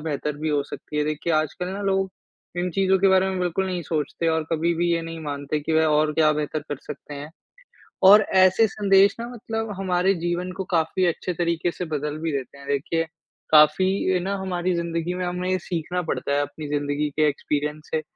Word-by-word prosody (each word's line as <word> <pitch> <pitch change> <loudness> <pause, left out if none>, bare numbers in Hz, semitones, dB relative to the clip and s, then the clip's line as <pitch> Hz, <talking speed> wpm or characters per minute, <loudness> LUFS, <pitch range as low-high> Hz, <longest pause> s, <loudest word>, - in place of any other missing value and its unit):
बेहतर 150 -1 -3
भी 155 +1 -3
हो 145 -1 +1
सकती 150 +1 -8
है 150 - +2
देखिए 155 +2 -2
आजकल 155 +3 -1
ना 195 +2 -5
लोग 195 -1 +1 0.5
इन 180 +1 -1
चीज़ों 190 +2 +2
के 195 - +4
बारे 190 0 +4
में 190 - -2
बिल्कुल 180 +2 0
नहीं 180 -2 -2
सोचते 160 +1 -2
और 160 -1 +1
कभी 165 +2 +1
भी 175 +1 +1
ये 165 - +1
नहीं 165 0 -6
मानते 145 0 -3
कि 160 +2 -3
वह 160 0 +4
और 150 0 +2
क्या 155 0 +4
बेहतर 150 0 -2
कर 145 - -3
सकते 145 - -8
हैं। 145 +2 -7 0.8
और 210 +1 +9 0.2
ऐसे 190 +4 +5
संदेश 195 -1 +4
ना 235 - -4
मतलब 225 -2 -4
हमारे 185 0 +2
जीवन 175 +1 -2
को - - 0
काफ़ी 165 +3 +1
अच्छे 175 +1 -1
तरीके 170 0 0
से 180 - -5
बदल 150 -1 -3
भी 160 0 -2
देते 140 -1 -4
हैं 140 0 -13
देखिए, 145 +4 0 0.5
काफ़ी 155 +4 +6 0.3
ए, - - +2
ना 195 +3 -2
हमारी 185 -1 -1
ज़िंदगी 170 0 -2
में 180 0 -3
हमें 180 +1 -2
ये 185 - +2
सीखना 175 +1 -3
पड़ता 160 -4 -2
है 145 - +2
अपनी 145 +1 -5
ज़िंदगी 145 0 -1
के 155 0 +3
एक्सपीरियंस 150 +1 -2
से 155 - +1
165 Hz, 210 wpm, -24 LUFS, 150-185 Hz, 0.8 s, और